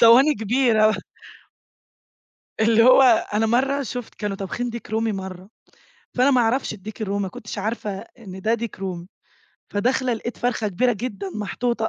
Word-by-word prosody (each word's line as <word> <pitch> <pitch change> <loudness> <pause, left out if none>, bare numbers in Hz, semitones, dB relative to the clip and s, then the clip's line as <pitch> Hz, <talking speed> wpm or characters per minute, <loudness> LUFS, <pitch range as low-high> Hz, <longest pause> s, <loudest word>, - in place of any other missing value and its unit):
صواني 250 +6 +7
كبيرة. 220 -1 +3 1.6
اللي 225 +1 +5
هو 255 +2 +7 0.3
أنا 220 +1 +2
مرّة 270 +5 +1
شُفت 245 0 -6
كانوا 205 -2 -3
طابخين 220 +6 -4
ديك 235 0 -8
رومي 225 0 0
مرّة، 190 0 -7 0.7
فأنا 255 +3 +4
ما 255 -2 +4
أعرفش 235 +3 +1
الديك 215 +3 -8
الرومي 200 0 -1
ما 190 - -2
كنتش 210 +3 -8
عارفة 215 0 -2 0.3
إن 190 -4 -9
ده 225 +4 +2
ديك 235 -3 -5
رومي، 180 -3 -5 0.7
فداخلة 250 +4 +1
لقِيت 235 +1 -4
فرخة 230 -3 0
كبيرة 245 +7 +1
جدًا 200 -3 -5
محطوطة 220 +2 -1
225 Hz, 150 wpm, -23 LUFS, 205-245 Hz, 1.6 s, صواني